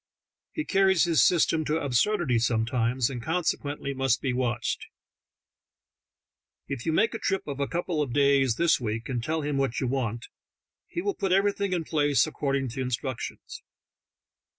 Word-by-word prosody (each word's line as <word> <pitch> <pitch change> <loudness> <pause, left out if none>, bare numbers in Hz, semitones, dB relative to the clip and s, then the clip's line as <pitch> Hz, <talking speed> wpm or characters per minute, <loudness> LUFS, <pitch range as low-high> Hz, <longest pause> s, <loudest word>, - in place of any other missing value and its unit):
He 310 - -3
carries 190 -3 +3
his 170 -3 +4
system 165 -2 +3
to 155 +2 0
absurdity 140 - +1
sometimes, 115 +1 +1
and 125 -3 -5
consequently 145 -2 -2
must 135 -2 +1
be 130 -2 -1
watched. 120 -2 -2 1.8
If 120 - -5
you - - +3
make 220 +9 +2
a 225 - -4
trip 195 -1 -1
of 140 -2 -5
a 140 - 0
couple 170 -2 -2
of 140 -4 -2
days 140 -2 +3
this 170 +1 +3
week, 115 +1 -3
and 120 -3 -2
tell 160 +3 -1
him 145 -1 -1
what 135 -3 0
you - - -1
want, 120 -3 -2 0.6
he 345 - -4
will 405 0 0
put 195 - -2
everything 200 +1 +2
in 175 -2 0
place 145 -3 +2
according 140 -4 -2
to 130 +3 -5
instructions. 130 0 -4
140 Hz, 160 wpm, -27 LUFS, 125-170 Hz, 1.8 s, his